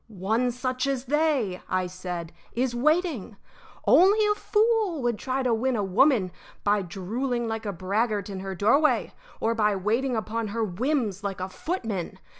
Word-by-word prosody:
"One 225 Hz, +5 st, +2 dB
such 255 Hz, +1 st, -2 dB
as 270 Hz, -2 st, -1 dB
they," 275 Hz, -10 st, +1 dB
I 185 Hz, 0 st, +1 dB
said, 180 Hz, -2 st, -6 dB, 0.2 s
"is 250 Hz, +1 st, 0 dB
waiting. 285 Hz, -, 0 dB, 0.5 s
Only 375 Hz, -, +6 dB
a 420 Hz, -, +3 dB
fool 420 Hz, -, +1 dB
would 240 Hz, -3 st, 0 dB
try 265 Hz, 0 st, -1 dB
to 245 Hz, -2 st, +2 dB
win 250 Hz, +3 st, +1 dB
a 210 Hz, -, 0 dB
woman 200 Hz, 0 st, +3 dB, 0.3 s
by 205 Hz, 0 st, +3 dB
drooling 230 Hz, +7 st, -3 dB
like 225 Hz, -1 st, -3 dB
a -, -, 0 dB
braggart 200 Hz, +3 st, -1 dB
in 195 Hz, -2 st, -5 dB
her 190 Hz, 0 st, -5 dB
doorway 275 Hz, -, +3 dB, 0.3 s
or 225 Hz, -, +1 dB
by 210 Hz, -2 st, +2 dB
waiting 230 Hz, +7 st, 0 dB
upon 220 Hz, +1 st, -2 dB
her 225 Hz, +2 st, -2 dB
whims 215 Hz, -, -1 dB
like 200 Hz, -1 st, -3 dB
a 185 Hz, +1 st, -3 dB
footman. 220 Hz, -, -4 dB
230 Hz, 165 wpm, -26 LUFS, 200-270 Hz, 0.5 s, Only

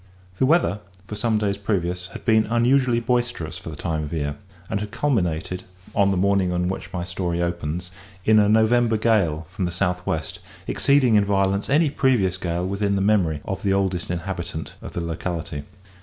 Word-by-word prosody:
The 130 Hz, -, +4 dB
weather, 160 Hz, -, +3 dB, 0.3 s
for 105 Hz, -, -8 dB
some 110 Hz, +1 st, +1 dB
days 100 Hz, -2 st, 0 dB
previous, 90 Hz, -3 st, -1 dB
had -, -, -10 dB
been 110 Hz, -2 st, +4 dB
unusually 120 Hz, +1 st, +3 dB
boisterous 120 Hz, -9 st, -1 dB
for 95 Hz, -, -8 dB
the 80 Hz, -, -7 dB
time 80 Hz, +1 st, -2 dB
of 75 Hz, -, -5 dB
year, 75 Hz, -3 st, -2 dB, 0.3 s
and 100 Hz, -, -1 dB
had 105 Hz, 0 st, -4 dB
culminated, 90 Hz, -, -1 dB, 0.3 s
on 100 Hz, -1 st, +3 dB
the 95 Hz, -, +1 dB
morning 100 Hz, -1 st, +2 dB
on 90 Hz, 0 st, 0 dB
which 95 Hz, -, -5 dB
my 90 Hz, -2 st, -3 dB
story 85 Hz, -1 st, -2 dB
opens, 85 Hz, 0 st, -3 dB, 0.3 s
in 110 Hz, 0 st, +6 dB
a 105 Hz, -1 st, +4 dB
"November 110 Hz, +1 st, +4 dB
gale" 100 Hz, -8 st, +2 dB
from 95 Hz, -, -2 dB
the 90 Hz, -, -2 dB
south 90 Hz, 0 st, -1 dB
west, 80 Hz, 0 st, -2 dB, 0.3 s
exceeding 140 Hz, -4 st, +3 dB
in 105 Hz, -1 st, +5 dB
violence 100 Hz, 0 st, +1 dB
any 150 Hz, +1 st, +3 dB
previous 120 Hz, -11 st, +2 dB
gale 85 Hz, 0 st, -2 dB
within 100 Hz, +1 st, 0 dB
the -, -, +1 dB
memory 95 Hz, -7 st, +2 dB
of 95 Hz, 0 st, -4 dB
"the 100 Hz, -1 st, +1 dB
oldest 95 Hz, -3 st, 0 dB
inhabitant" 85 Hz, -2 st, -4 dB
of -, -, -8 dB
the 85 Hz, -, -2 dB
locality. 80 Hz, -3 st, -4 dB
95 Hz, 185 wpm, -23 LUFS, 85-110 Hz, 0.3 s, in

